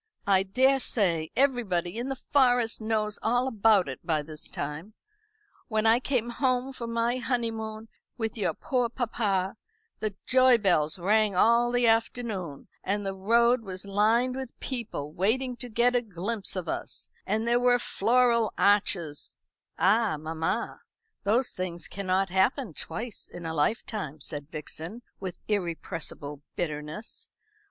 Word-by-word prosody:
I 195 -1 +4
daresay 200 -7 +2
everybody 225 -8 +1
in 250 +3 -3
the 270 - -2
Forest 245 -4 +2
knows 215 -1 -1
all 245 +3 +1
about 215 -5 +4
it 130 - -7
by 155 -3 0
this 155 0 -8
time. 150 +9 -5 0.7
When 220 -1 0
I 225 +2 +6
came 250 -3 -1
home 255 +1 0
from 235 -2 -5
my 235 +2 +1
honeymoon 225 -3 -2 0.3
with 225 -2 -2
your 210 - -1
poor 250 -3 0
papa, 215 -5 -1 0.4
the 215 -3 -2
joy 255 -1 +6
bells 175 -6 +2
rang 210 +2 +2
all 235 +5 +4
the 245 0 +2
afternoon, 225 - 0 0.2
and 205 +1 -1
the 195 - -1
road 235 +5 +3
was 185 -3 -5
lined 220 +6 +2
with 260 -2 -7
people 220 - -4
waiting 245 +8 +1
to 245 0 -7
get 240 +3 +3
a 245 - +3
glimpse 205 0 -3
of 180 -3 -3
us, - - -4 0.2
and 220 +3 0
there 240 +1 +4
were 245 0 +4
floral 235 0 +2
arches 190 -7 +1 0.2
" - - -60
"Ah, 205 -2 +3
mamma, 160 +1 -3 0.4
those 235 +6 +2
things 175 -2 -4
cannot 190 0 0
happen 195 - +1
twice 225 +7 -6
in 175 -1 -9
a 160 - -3
lifetime," 155 -1 -1
said 145 0 -5
Vixen, 165 +9 -7 0.2
with 185 -3 -5
irrepressible 165 -6 -3
bitterness. 155 +4 -5
215 Hz, 145 wpm, -28 LUFS, 185-240 Hz, 0.7 s, I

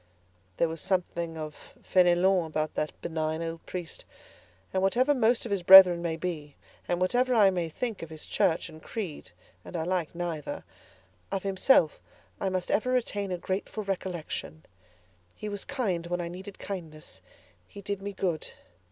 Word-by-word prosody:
There 170 - +3
was 160 0 -6
something 170 -3 -1
of 155 -1 -8
Fénélon 180 0 +4
about 155 0 -2
that 150 - -3
benign 160 0 -2
old 165 0 -5
priest; 175 -3 -6 0.7
and 190 - +1
whatever 245 +9 +3
most 240 -2 +2
of 230 - -5
his 200 -2 +1
brethren 180 -1 +10
may 170 -2 -1
be, 160 -4 -5 0.3
and 175 - 0
whatever 245 +7 +2
I 205 -4 +6
may 175 -3 -2
think 225 +5 -3
of 165 - -7
his 155 -1 -7
Church 165 - +1
and 160 -1 -12
creed 190 -7 -6 0.3
(and 175 - -6
I 160 - -1
like 175 -2 -1
neither), 170 -4 -4 0.7
of 195 - -2
himself 190 - +3 0.4
I 195 - 0
must 185 -1 -2
ever 250 - +1
retain 205 -6 -1
a 180 - -1
grateful 190 +4 -3
recollection. 175 - -4 0.7
He 215 - -6
was 205 -1 -5
kind 205 -12 -2
when 175 +1 -2
I 170 -1 -3
needed 190 +3 -9
kindness; 155 - -7 0.5
he - - -11
did 200 0 -4
me 200 +1 -4
good. 180 -5 -2
180 Hz, 165 wpm, -28 LUFS, 165-200 Hz, 0.7 s, brethren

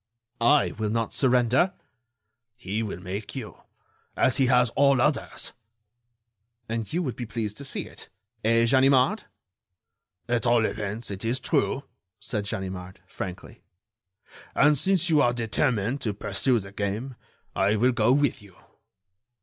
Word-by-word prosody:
"I 140 +5 +4
will 110 -1 0
not 115 +1 -1
surrender." 130 +6 +3 0.8
"He 110 -2 -3
will 105 -5 -4
make 95 +4 -6
you, - - -7 0.6
as 130 - +3
he 135 - +3
has 125 -2 +4
all 140 0 +4
others." 150 +3 -1 1.1
"And 115 -1 -4
you 175 +3 0
would 130 -7 -3
be 120 - -6
pleased 105 -2 -4
to - - -7
see 135 - -3
it—eh, 115 +2 -2
Ganimard?" 135 - +3 1.0
"At 120 -1 0
all 120 -1 +4
events, 105 +2 -4
it 95 +1 -6
is 120 +3 0
true," - - 0 0.4
said 105 -1 -4
Ganimard, 95 -1 -5
frankly. 90 -1 -8 0.9
"And 150 +1 +5
since 185 +3 +1
you 150 -2 +5
are 120 -2 +3
determined 120 +1 0
to 105 -3 -2
pursue 125 +4 +1
the 100 -3 -6
game, 105 +6 -3 0.4
I 100 +2 +2
will 125 +4 +3
go 115 0 +2
with 145 -4 +2
you." 100 -3 -17
115 Hz, 140 wpm, -26 LUFS, 105-130 Hz, 1.1 s, And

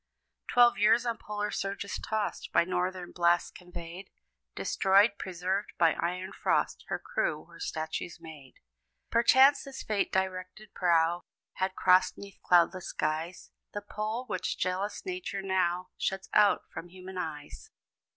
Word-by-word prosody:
Twelve 240 -1 +5
years 225 +3 +4
on 235 -1 -2
polar 210 0 -3
surges 200 0 -3
tossed, 220 -1 -3
By - - +4
northern 180 0 -2
blasts 175 0 +2
conveyed 180 +1 -9 0.5
Destroyed 200 +2 +3
preserved, 185 +2 -2
by 165 -2 +4
iron 180 +2 -3
frost, - - 0
Her - - -1
crew - - -2
were - - -16
statues 160 - -4
made. 155 -5 -12 0.6
Perchance 265 +4 +6
this 275 -1 -8
fate 210 -2 0
directed 190 +2 -3
prow 170 -1 +2 0.4
Had 190 0 -1
crossed 185 +1 +4
'neath 200 -1 -11
cloudless 180 +1 +3
skies 155 +3 -3 0.2
The 205 - -3
pole, 215 +4 -4
which 230 - -3
jealous 195 - -2
Nature 365 - -4
now 185 -1 0
Shuts 195 0 -2
out 210 -1 +5
from 170 - -6
human 185 +1 -8
eyes. 150 -4 -7
190 Hz, 135 wpm, -30 LUFS, 175-210 Hz, 0.6 s, Perchance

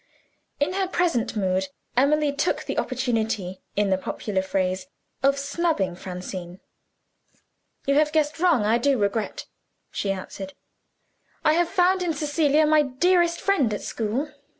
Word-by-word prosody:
In 295 +5 +1
her 385 0 0
present 335 -12 0
mood, 190 -2 0 0.3
Emily 290 +3 +3
took 290 +5 0
the - - -2
opportunity 225 -7 -1
(in 205 -1 +1
the 190 - +2
popular 190 +1 -2
phrase) 190 +2 -1 0.3
of 275 +1 +3
snubbing 280 - 0
Francine. 180 0 -7 1.3
"You 275 - +2
have 300 +1 +3
guessed 310 0 +1
wrong; 340 -10 +3
I 225 +3 +3
do 275 +2 +2
regret," 205 +1 -1 0.5
she 200 - -1
answered. 190 0 -6 0.9
"I 305 - +5
have 340 +1 +2
found 370 0 +3
in 345 -2 0
Cecilia 300 0 +2
my 305 0 +5
dearest 340 +5 +2
friend 315 - +2
at - - -7
school. 240 +7 -2
275 Hz, 140 wpm, -25 LUFS, 200-310 Hz, 1.3 s, I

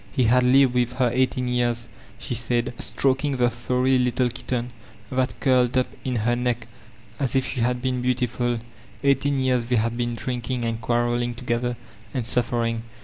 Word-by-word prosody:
He 130 - +1
had 125 +2 +4
lived 130 +1 +5
with 125 0 +1
her 125 -2 +1
eighteen 130 0 +1
years, 120 -1 0 0.3
slie 120 - -3
said, 120 +2 0
stroking 135 +1 0
the 120 -1 +3
furry 125 +2 +1
little 125 0 +2
kitten 120 0 -3 0.4
that 130 0 -1
curled 130 -2 +3
up 130 - +4 0.2
in 130 -1 -2
her 120 +2 +1
neck 120 -1 -1 0.5
as 135 -3 -1
if 130 - +3
she 130 - -3
had 125 +1 0
been 130 -1 0
beautifuL 120 -1 0 0.4
Eighteen 140 0 +2
years 130 -3 +1
they 125 - +1
had 115 +1 +1
been 120 0 -1
drinking 120 +1 -3
and 115 0 -2
qnarreSng 120 +1 0
together— 120 0 -2 0.4
and 125 -3 -1
suffering. 115 -1 0
125 Hz, 170 wpm, -24 LUFS, 120-130 Hz, 0.5 s, lived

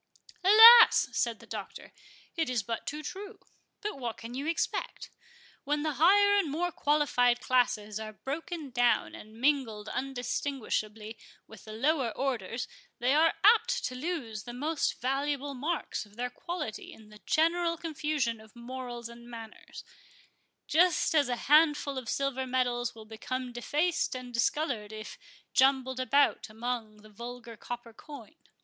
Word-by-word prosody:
"Alas!" 450 +4 +9
said 235 -2 -1
the 230 - -15
Doctor, 215 -3 -8 0.4
"it 325 -6 -1
is 240 -5 -1
but 230 +2 -5
too 300 +1 -4
true; 395 +6 -8 0.4
but 420 -8 -4
what 235 -3 -4
can 230 +1 -9
you 275 +4 -4
expect? 330 - -3 0.5
When 295 +1 -1
the 305 -4 -2
higher 405 +4 +6
and 390 -7 +1
more 345 +5 -1
qualified 280 -6 +2
classes 235 -5 0
are 215 0 -6
broken 310 - -6
down 245 0 +2
and 215 +1 -12
mingled 240 -6 0
undistinguishably 245 -4 -3 0.3
with 220 - -15
the 215 - -9
lower 265 +2 +1
orders, 245 -3 -2 0.3
they 250 +3 +1
are 320 +2 +4
apt 470 +3 +4
to - - -3
lose 255 - -4
the 240 - -7
most 300 +4 -1
valuable 280 +2 -1
marks 300 +6 -3
of 205 - -21
their 245 +1 -3
quality 305 -5 -6
in 220 -1 -15
the 210 -1 -15
general 335 +1 +2
confusion 295 -8 -2
of 220 +1 -18
morals 240 -1 -7
and 235 0 -13
manners—just 315 - -3
as 290 -5 +3
a 245 - 0
handful 295 -2 +4
of 245 - -8
silver 265 -1 -1
medals 245 -2 -1
will 220 -1 -11
become 250 +3 -5
defaced 300 +7 -1
and 250 -1 -8
discoloured 235 -3 -1
if 215 0 -9 0.3
jumbled 260 -1 +3
about 275 -2 +2
among 220 -2 -5
the 215 - -15
vulgar 235 +2 -9
copper 240 +1 -8
coin. 285 -1 -12
255 Hz, 145 wpm, -29 LUFS, 230-300 Hz, 0.5 s, Alas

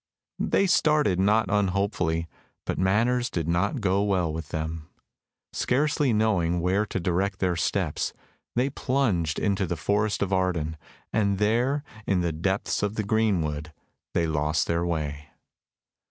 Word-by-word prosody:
They 195 - +2
started 150 - +3
not 105 +3 +3
unhopefully, 95 -4 0 0.4
but - - -2
matters 120 +6 +2
did 85 -2 -3
not 100 +9 0
go 100 0 +2
well 95 -6 +1
with 80 -1 -6
them. 80 0 -4 0.7
Scarcely 145 +1 +1
knowing 100 -6 +2
where 95 +5 +1
to 95 - -2
direct 95 +2 0
their 90 -2 0
steps, 85 - -1 0.4
they 130 +3 +1
plunged 115 - 0
into 100 -2 0
the 85 - -2
Forest 105 +2 0
of 100 -1 -2
Arden, 90 -4 0 0.4
and 100 -2 +2
there, 120 +8 +1 0.2
in 95 -3 +2
the 85 -1 0
depths 95 +5 -1
of 105 +1 -1
the 110 - -1
greenwood, 85 -9 0 0.4
they 85 - +2
lost 75 0 0
their 85 0 0
way. 75 -4 -3
95 Hz, 140 wpm, -26 LUFS, 85-110 Hz, 0.7 s, started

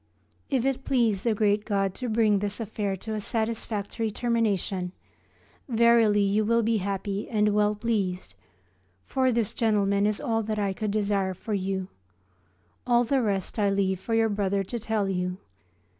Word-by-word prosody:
If 265 -3 +1
it 270 0 0
please 230 -7 +1
the 230 0 +1
great 205 0 +2
God 195 -3 0
to 250 +2 -4
bring 215 -2 +3
this 205 +1 -2
affair 210 -3 -2
to 220 +4 -6
a 215 - -2
satisfactory 220 0 -2
termination, 205 -6 -1 0.8
verily 230 -3 +4
you 200 +2 +2
will 230 +2 +2
be 225 +1 +2
happy 200 0 -3
and 210 -2 +2
well 210 0 +2
pleased, 200 - -2 0.7
for 260 -1 +1
this 230 -3 0
gentleman 205 -2 +2
is 210 -1 -1
all 225 -1 0
that 215 0 -3
I 200 -2 0
could 215 +2 -3
desire 200 -2 0
for 215 +4 -5
you. 190 -1 -2 1.0
All 240 -1 +4
the 265 +3 +1
rest 200 -1 -2
I 205 -1 +3
leave 195 -2 0
for 225 +4 -2
your 225 0 +3
brother 200 -1 0
to 235 +5 -5
tell 215 -2 -1
you. 180 -1 -2
210 Hz, 165 wpm, -26 LUFS, 195-225 Hz, 1.0 s, verily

